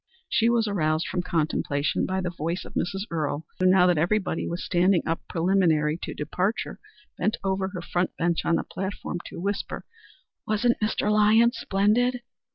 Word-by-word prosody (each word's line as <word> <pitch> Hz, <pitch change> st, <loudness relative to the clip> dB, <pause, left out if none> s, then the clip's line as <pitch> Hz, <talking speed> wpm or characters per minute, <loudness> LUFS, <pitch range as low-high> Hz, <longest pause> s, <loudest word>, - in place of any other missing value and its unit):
She 230 Hz, +1 st, +2 dB
was 235 Hz, -2 st, +2 dB
aroused 155 Hz, -5 st, 0 dB
from 180 Hz, -, -1 dB
contemplation 155 Hz, -4 st, 0 dB
by 190 Hz, 0 st, -1 dB
the 180 Hz, -1 st, -2 dB
voice 170 Hz, +1 st, -3 dB
of -, -, -11 dB
Mrs. 195 Hz, +3 st, -2 dB
Earle, 155 Hz, -1 st, -2 dB
who, 185 Hz, -, +3 dB
now 185 Hz, -1 st, +6 dB
that 175 Hz, -4 st, +3 dB
everybody 185 Hz, +1 st, 0 dB
was 170 Hz, +1 st, -4 dB
standing 180 Hz, 0 st, +3 dB
up 165 Hz, 0 st, -1 dB
preliminary 165 Hz, -3 st, +2 dB
to -, -, -5 dB
departure, 185 Hz, +8 st, -2 dB, 0.4 s
bent 215 Hz, +5 st, +1 dB
over 190 Hz, 0 st, 0 dB
her 180 Hz, -3 st, -6 dB
front 175 Hz, +1 st, -1 dB
bench 170 Hz, 0 st, 0 dB
on 170 Hz, -, +2 dB
the -, -, 0 dB
platform 190 Hz, -2 st, -5 dB
to -, -, -8 dB
whisper, 200 Hz, +3 st, -3 dB, 0.6 s
"Wasn't 225 Hz, +3 st, +1 dB
Mr. 210 Hz, 0 st, +1 dB
Lyons 220 Hz, +3 st, +5 dB
splendid?" 240 Hz, +6 st, +1 dB
185 Hz, 165 wpm, -26 LUFS, 170-210 Hz, 0.6 s, now